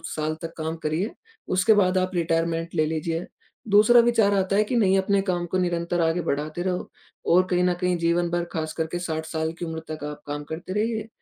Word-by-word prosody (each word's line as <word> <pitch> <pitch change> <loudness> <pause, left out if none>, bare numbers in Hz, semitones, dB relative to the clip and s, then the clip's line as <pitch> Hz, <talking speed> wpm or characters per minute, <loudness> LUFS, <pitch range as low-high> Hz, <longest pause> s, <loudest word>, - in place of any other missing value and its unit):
साल 155 0 -1
तक 165 0 -6
काम 160 +1 -3
करिए, 160 +8 0 0.4
उसके 185 +4 +4
बाद 185 -2 +3
आप 185 0 +1
रिटायरमेंट 165 0 0
ले 155 -1 +3
लीजिए। 160 +2 -2 0.4
दूसरा 215 +4 +7
विचार 230 -4 +3
आता 195 0 +1
है 210 - +4
कि 230 +4 -3
नहीं 195 -5 +4
अपने 195 +1 +2
काम 175 -1 0
को 185 - +1
निरंतर 175 -1 0
आगे 165 +2 +1
बढ़ाते 155 +1 -2
रहो 180 -1 -2 0.4
और 180 +1 +6
कहीं 180 0 +2
न 180 0 +3
कहीं 180 -1 +1
जीवन 170 +1 +1
भर 175 0 0
खासकर 160 0 -2
के 175 - -2
60 160 -2 -3
साल 160 0 -2
की 175 - -3
उम्र 160 0 -4
तक 155 -1 -6
आप 150 - -9
काम 145 0 -4
करते 170 +3 -5
रहिए, 220 +1 -1
175 Hz, 215 wpm, -25 LUFS, 160-190 Hz, 0.4 s, दूसरा